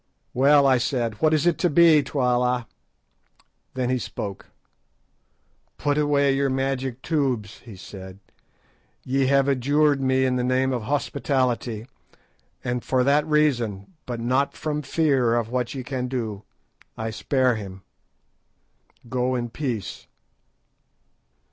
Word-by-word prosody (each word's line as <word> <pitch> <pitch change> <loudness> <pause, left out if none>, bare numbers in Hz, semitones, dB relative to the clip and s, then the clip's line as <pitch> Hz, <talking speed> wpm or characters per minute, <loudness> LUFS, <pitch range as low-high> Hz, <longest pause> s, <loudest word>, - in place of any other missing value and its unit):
"Well," 140 +2 +5
I 130 -2 +4
said, 120 -4 -2
"what 155 - +4
is 155 0 +2
it 175 -2 +2
to 175 - +2
be, 160 -1 +6
Twala?" 125 -3 0 1.1
Then 130 -1 -1
he 130 - +1
spoke. 100 -3 -6 1.3
"Put 145 -1 0
away 145 -2 +2
your 140 0 +1
magic 130 -1 -2
tubes," 130 - -1
he 115 -5 -12
said; 95 0 -10 0.9
"ye 135 +1 +1
have 140 0 +3
adjured 140 +2 +2
me 130 0 +2
in 130 -1 +1
the 125 - 0
name 130 +1 +1
of 120 - -2
hospitality, 125 -4 -1 0.8
and 120 0 -2
for 130 -1 +1
that 145 +3 +2
reason, 130 - 0
but 120 -2 -4
not 130 +4 0
from 150 -1 -3
fear 135 -5 +1
of 115 -2 -1
what 125 0 -2
ye 130 - -4
can 125 0 -3
do, 110 -5 -4 0.5
I 110 0 -3
spare 130 +2 +1
him. 95 -4 -7 1.2
Go 125 +1 -1
in 120 -2 -3
peace." 120 -7 -4
130 Hz, 130 wpm, -24 LUFS, 120-140 Hz, 1.3 s, be